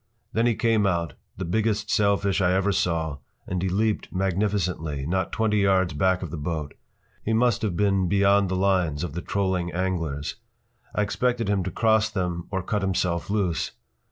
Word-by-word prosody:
” - - -44
Then 115 +2 +2
he 120 - +2
came 110 -3 +2
out, 85 -4 -1 0.2
the 95 - -3
biggest 110 +3 0
sailfish 100 -1 +2
I 90 0 +3
ever 95 +2 +2
saw, 85 -6 0 0.3
and 90 -1 -2
he 95 - 0
leaped 105 +3 0
magnificently, 90 -6 -1
not 95 +3 -1
twenty 110 -1 +1
yards 95 -4 +3
back 95 +4 +1
of 85 - -6
that 85 - -4
boat. 75 -1 -3 0.5
He 110 - 0
must 120 0 +2
have 100 -6 -1
been 100 -2 +2
beyond 100 0 +4
the 95 - -1
lines 90 -5 +1
of 85 - -4
the 85 - -4
trolling 95 -3 -1
anglers. 85 -4 -2 0.6
I 105 - +2
expected 120 +1 0
him 100 -2 +1
to - - -1
cross 110 +2 +3
them 90 -5 -3
or 95 -2 -2
cut 105 +2 -1
himself 90 -3 -1
loose. 90 -6 0
95 Hz, 185 wpm, -25 LUFS, 85-105 Hz, 0.6 s, beyond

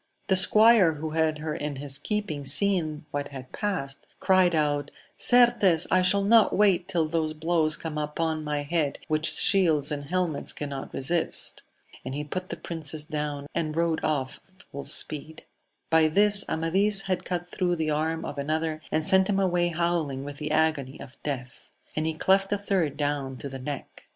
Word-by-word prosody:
The 190 - +4
squire 210 -1 +5
who 155 +1 -6
had 160 -1 0
her 155 0 -4
in 150 -1 -4
his 140 0 -3
keeping 205 -5 -3
seeing 155 0 +3
what 145 0 -3
had 130 -2 -10
passed, 160 -10 -3
cried 185 -3 +3
Out, 145 -2 0 0.3
Certes 240 -9 +4
I 185 - +4
shall 195 +2 +2
not 225 +1 +4
wait 190 -4 +3
till 170 -5 0
those 155 -1 -1
blows 160 -1 +1
come 155 -2 -5
upon 155 +1 -2
my 150 -1 -2
head 150 -1 -1
which 155 0 +1
shields 155 -3 +3
and 145 -1 -4
helmets 175 -5 -1
cannot 140 -2 -6
resist! 165 +6 -2 0.4
and 130 +2 -5
he 150 - -3
put 185 +5 -6
the - - -5
princess 155 -2 -4
down, 150 -2 -4
and 155 -2 -2
rode 165 -1 0
off 140 -3 -2 0.3
full 140 0 -7
speed. 155 +1 -2 0.5
By 160 -1 +5
this 205 +4 +6
Amadis 195 +5 +3
had 185 -2 -2
cut 175 -1 -5
thro' 180 -2 0
the 160 -2 -1
arm 160 +2 -1
of 145 - -6
another, 155 +2 -2
and 155 - 0
sent 190 +2 +3
him 195 -1 +1
away 175 -2 +1
howling 165 -5 -1
with 145 0 -8
the 150 0 -5
agony 155 -4 0
of 130 - -13
death; 130 -4 -6 0.3
and 155 +1 -1
he 160 - -2
cleft 195 +4 +2
a 205 - +2
third 185 -8 -1
down 145 -3 -2
to 140 - -7
the 135 0 -8
neck. 140 +1 -7
160 Hz, 180 wpm, -26 LUFS, 145-180 Hz, 0.5 s, this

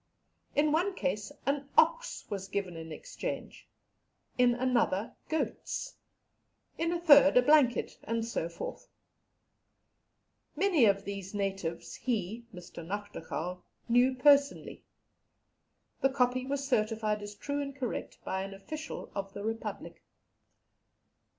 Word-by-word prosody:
In 295 +1 +3
one 365 +5 +1
case 210 - -2
an 280 0 -1
ox - - +3
was 195 -2 -4
given 195 -3 -3
in 160 0 -7
exchange, - - -6 0.7
in 245 -1 +4
another 240 -5 +1
goats, 320 +9 -2 0.8
in 330 +1 0
a 345 - 0
third 290 -5 +7
a - - +8
blanket, 285 -3 +4
and 230 0 -1
so 200 -7 -2
forth. 170 - -7 1.7
Many 340 -6 +4
of 200 -1 +3
these 200 0 -6
natives 195 -4 -3
he 230 -1 -2
(Mr. 175 -3 -9
Nachtigal) 180 -2 -5 0.3
knew 245 +2 +4
personally. 280 +2 +3 1.2
The 270 - +4
copy 255 -1 +1
was 280 0 -2
certified 215 -3 +1
as 205 0 -7
true 285 +7 -3
and 275 -1 -5
correct 260 -4 -4
by 190 - -1
an 195 0 -6
official 310 +11 -7
of 195 -1 -4
the 200 - -6
Republic." 225 +1 -5
235 Hz, 120 wpm, -31 LUFS, 200-280 Hz, 1.7 s, a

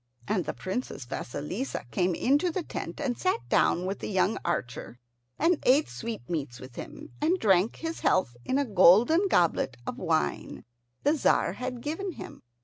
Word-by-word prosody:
And 190 -5 0
the - - -4
Princess 190 - -4
Vasilissa 150 - -4
came 180 -1 +1
into 290 +7 +2
the 345 +1 -3
tent - - -6
and 270 -5 -1
sat 375 - -1
down 180 - +3
with 195 +1 -3
the - - -5
young 195 +2 +1
archer, 125 -7 -3 0.4
and 340 -1 +2
ate 280 +5 +4
sweetmeats 155 - -5
with 130 -1 -11
him, 310 - -8
and 330 +5 +2
drank 195 - +3
his 325 0 -5
health 120 -10 +1
in 260 - 0
a 285 - +1
golden 225 - +5
goblet 165 - +2
of - - -4
the - - -8
wine 75 - -1 0.4
the 290 - +4
Tzar 265 - +2
had 250 +2 -5
given 350 +5 -3
him. - - -10
225 Hz, 170 wpm, -28 LUFS, -, 0.4 s, golden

